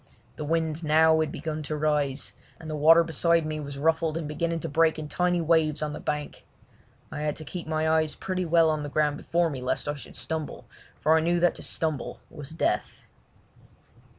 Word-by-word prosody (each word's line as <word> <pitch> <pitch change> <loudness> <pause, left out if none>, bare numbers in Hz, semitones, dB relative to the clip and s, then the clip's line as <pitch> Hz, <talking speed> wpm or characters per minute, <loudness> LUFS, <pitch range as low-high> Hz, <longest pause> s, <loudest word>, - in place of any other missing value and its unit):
The - - -5
wind 160 0 0
had 165 - -8
now 160 +1 +5
begun 155 +1 -5
to 155 +1 -4
rise, 150 -2 0 0.3
and 160 - -10
the 155 - -3
water 165 +3 +6
beside 165 0 +2
me 155 0 -3
was 140 -1 -6
ruffled 160 +2 +1
and 165 -3 -4
beginning 165 +2 -2
to - - -3
break 160 +2 +2
in 155 -1 -5
tiny 180 +2 +1
waves 160 -2 +2
on 150 0 -3
the - - -6
bank. 150 -1 -4 0.7
I 150 - -5
had 150 -1 -1
to 155 - -8
keep 175 0 -6
my 155 0 0
eyes 155 -1 +2
pretty 185 -1 -3
well 165 -1 +4
on 155 -1 -1
the 145 - -5
ground 150 0 +1
before 170 +1 0
me, 130 -3 -5
lest 130 +2 -2
I 145 - 0
should 145 - -10
stumble, 160 -2 -4 0.4
for 160 +1 +4
I - - +4
knew 170 +2 +1
that 175 - +4
to - - -10
stumble 155 -5 -2
was 150 -3 -9
death. 160 +1 -2
155 Hz, 205 wpm, -27 LUFS, 150-165 Hz, 0.7 s, water